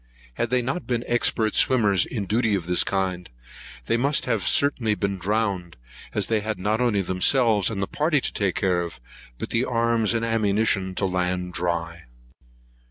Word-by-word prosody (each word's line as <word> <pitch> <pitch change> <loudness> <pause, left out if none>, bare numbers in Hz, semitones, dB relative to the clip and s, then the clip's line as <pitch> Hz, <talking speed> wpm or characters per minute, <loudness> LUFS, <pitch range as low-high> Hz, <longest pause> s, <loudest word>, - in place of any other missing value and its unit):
Had 115 - -2
they 125 0 +1
not 135 +9 -3
been 120 -2 -1
expert 115 -2 +1
swimmers, 105 -8 +3
in 105 -5 -4
duty 110 +1 +1
of 90 -4 -3
this 90 0 +4
kind, 95 -2 -2 0.6
they 115 - +1
must 140 +4 +2
have 115 -5 0
certainly 125 -7 +2
been 100 -1 -2
drowned, 95 - -2 0.4
as - - +2
they 110 -1 +1
had 110 0 -3
not 105 +5 -1
only 105 -5 +1
themselves 105 +3 +2
and 100 -3 -3
the - - -3
party 150 0 +1
to - - -4
take 100 -3 -1
care 90 -3 +1
of, 85 -2 -7 0.4
but - - -5
the 115 - +1
arms 115 -2 +1
and 115 0 0
ammunition 105 -4 0
to 100 - 0
land 90 -1 -2
dry. 85 -1 -3
105 Hz, 175 wpm, -24 LUFS, 90-115 Hz, 0.6 s, this